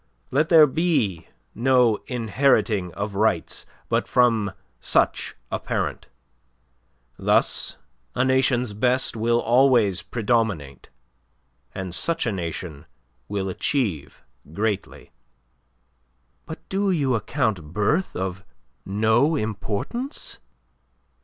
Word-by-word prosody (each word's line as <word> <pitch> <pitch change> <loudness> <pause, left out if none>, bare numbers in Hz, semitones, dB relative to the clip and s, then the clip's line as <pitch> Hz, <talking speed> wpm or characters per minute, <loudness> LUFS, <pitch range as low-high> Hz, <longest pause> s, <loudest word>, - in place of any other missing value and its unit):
Let 150 +4 +2
there 160 -3 +8
be 145 - 0 0.3
no 125 -2 +3
inheriting 115 -5 +1
of 100 0 -4
rights 100 -4 0 0.2
but - - 0
from 115 -5 +2 0.3
such - - 0 0.2
a - - -1
parent. - - -3 1.1
Thus - - +1 0.4
a 125 - +2
nation's 130 -3 +2
best 125 +5 +1
will 115 +1 +1
always 120 -7 +3
predominate, 105 - -1 0.9
and 95 -2 -5
such 165 - 0
a 115 - 0
nation 85 -4 -5 0.4
will 100 -1 -2
achieve 95 - -2 0.3
greatly." 100 +2 -3 1.4
"But 160 - -9
do 195 +1 0
you 145 -8 +1
account 110 - -1
birth 150 - 0
of 95 +1 -4 0.4
no 110 +10 +2
importance?" 110 - -3
110 Hz, 95 wpm, -23 LUFS, 100-130 Hz, 1.4 s, there